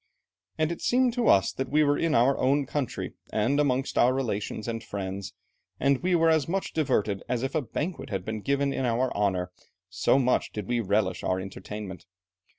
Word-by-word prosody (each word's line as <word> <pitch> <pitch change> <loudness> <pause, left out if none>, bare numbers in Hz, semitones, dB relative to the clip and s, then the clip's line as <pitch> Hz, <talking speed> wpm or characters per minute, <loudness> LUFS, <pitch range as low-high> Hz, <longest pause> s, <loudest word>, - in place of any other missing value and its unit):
And 155 +1 +1
it 170 - -5
seemed 250 -1 +2
to 245 -1 0
us 95 - +5
that 135 -1 -4
we 150 +2 +4
were 145 0 +3
in 160 -1 +1
our 130 +4 +4
own 140 +2 +2
country, 140 0 -3 0.2
and 125 +7 +1
amongst 135 -2 +1
our 125 - +5
relations 110 -4 -3
and 115 -1 -3
friends; 100 -2 -5 0.4
and 140 -1 +2
we 180 0 +2
were 165 -1 +4
as 155 -4 +2
much 190 +3 -2
diverted 105 -10 0
as 125 0 -1
if 135 - -2
a 155 - +1
banquet 150 +5 -4
had 95 -4 -3
been 110 -1 -4
given 140 +3 0
in 135 - -2
our 125 +1 0
honour, 95 -3 0 0.4
so 90 +9 +3
much 130 -2 +1
did 105 -3 -5
we 120 0 0
relish 100 -2 0
our 95 0 0
entertainment. 95 -1 -7
125 Hz, 195 wpm, -27 LUFS, 105-145 Hz, 0.4 s, us